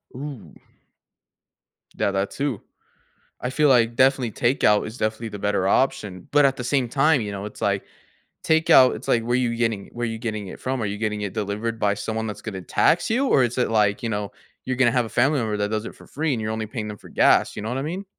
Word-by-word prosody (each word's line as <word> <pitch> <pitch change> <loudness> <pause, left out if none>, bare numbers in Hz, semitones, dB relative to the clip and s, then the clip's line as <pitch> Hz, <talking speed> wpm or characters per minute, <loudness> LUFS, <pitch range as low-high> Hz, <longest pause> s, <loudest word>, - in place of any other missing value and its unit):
Ooh. 130 - -8 1.4
Yeah, - - 0
that 95 0 -1
too. 135 -6 -3 0.8
I 125 - -2
feel 150 +2 +2
like 120 -3 +4
definitely 130 -2 +3
takeout 105 -2 +2
is 110 +3 -8
definitely 110 +1 -2
the 105 - -8
better 100 -2 0
option, 100 -5 0
but 145 0 +5
at 135 0 +1
the 125 - -4
same 125 -1 0
time, 145 +1 +3
you 105 - -4
know, 100 0 -5
it's 105 - -10
like 100 -1 0 0.6
takeout 160 -5 +5
it's - - -9
like, 115 - +2
where 120 +1 0
you 120 -2 0
getting 115 -4 -1
where 120 0 -3
you 115 0 -4
getting 110 -3 -4
it - - -9
from? 130 -1 -2
Are - - -1
you 100 0 -3
getting 105 -1 -2
it 100 -2 -4
delivered 110 +2 -3
by 100 -2 +2
someone 110 +2 -3
that's 105 - -6
gonna 95 -4 -6
tax 90 - +2
you, 255 +5 +1
or 135 - +4
is 120 0 -2
it 125 - +1
like 105 -2 +2
you 115 - -1
know, 105 -2 -3 0.3
you're 130 -1 -2
gonna 130 -2 +4
have 125 -1 +1
a - - -8
family 135 +6 +2
member 110 -3 -1
that 105 0 -1
does 110 0 -2
it - - -8
for - - -16
free, 155 0 -1
and 115 - -3
you're 110 0 -2
only 110 0 -3
paying 110 0 -5
them 105 -1 -7
for - - -15
gas, - - +3
you - - -5
know 110 - -4
what 125 - -2
I - - -2
mean. 175 +7 -4
115 Hz, 245 wpm, -23 LUFS, 105-130 Hz, 1.4 s, but